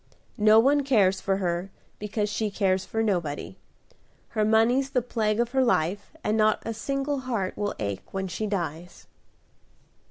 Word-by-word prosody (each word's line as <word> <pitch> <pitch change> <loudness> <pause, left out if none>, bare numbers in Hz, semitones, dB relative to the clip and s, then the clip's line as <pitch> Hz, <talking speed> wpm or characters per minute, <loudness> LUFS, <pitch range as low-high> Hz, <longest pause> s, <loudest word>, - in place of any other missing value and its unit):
No 215 +1 +6
one 280 +5 +4
cares 200 -9 +2
for 195 -1 0
her, 175 0 -2 0.3
because 210 0 -2
she 210 +1 -2
cares 190 -2 0
for 225 0 -1
nobody; 155 - -2 0.7
her 215 - 0
money's 225 +5 +3
the 260 -2 +1
plague 220 -3 -1
of 240 0 0
her 265 0 +3
life, 200 -3 0
and 210 - +1
not 215 -1 +2
a 225 - -2
single 275 +5 -2
heart 230 -8 -2
will 205 0 -2
ache 100 -2 -5
when 190 0 -3
she 200 +5 -3
dies." 175 -3 -4
210 Hz, 160 wpm, -26 LUFS, 190-230 Hz, 0.7 s, No